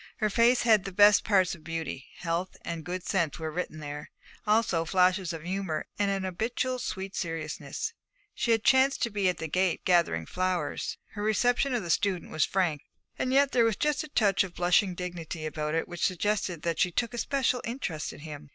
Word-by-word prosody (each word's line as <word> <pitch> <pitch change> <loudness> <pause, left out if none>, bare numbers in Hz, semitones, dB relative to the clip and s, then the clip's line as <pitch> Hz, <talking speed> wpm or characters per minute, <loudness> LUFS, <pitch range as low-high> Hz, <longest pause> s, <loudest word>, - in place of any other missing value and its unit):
Her 215 -1 0
face 235 +3 +4
had 220 -5 +5
the 195 - -5
best 205 +2 +6
parts 190 -4 +3
of 170 -4 -11
beauty: 160 -5 -5
health 175 +1 -3
and 170 -1 -4
good 180 +1 -4
sense 170 -7 0
were 160 -2 -4
written 165 -1 -4
there, 145 0 -7 0.4
also 210 -6 +2
flashes 180 +1 +2
of 165 -2 -7
humour 185 -3 -2
and 200 -1 +2
an 195 -1 -1
habitual 240 +7 -2
sweet 195 -4 -5
seriousness. 165 - -4 0.4
She - - -2
had 225 -1 +3
chanced 265 +2 +4
to 235 - 0
be 200 -2 +1
at 180 - -2
the 160 - -4
gate 180 +2 0
gathering 170 - +2
flowers. 180 - -2
Her 205 - -6
reception 245 +5 +2
of 230 - -1
the 170 - -2
student 185 -1 0
was 155 - +2
frank, 175 -7 0 0.4
and 255 - 0
yet 275 +1 +4
there 240 - +4
was 225 -2 +2
just 300 +5 0
a - - -8
touch 205 -10 +3
of 185 -3 -8
blushing 180 +2 +2
dignity 170 -3 -5
about 155 0 -2
it 165 - 0
which 175 -1 -6
suggested 185 -3 0
that 170 -1 -1
she 180 - +3
took 235 +6 -1
a 240 - -4
special 260 -2 0
interest 210 - -4
in - - -12
him. 150 -2 -9
185 Hz, 205 wpm, -28 LUFS, 165-220 Hz, 0.4 s, best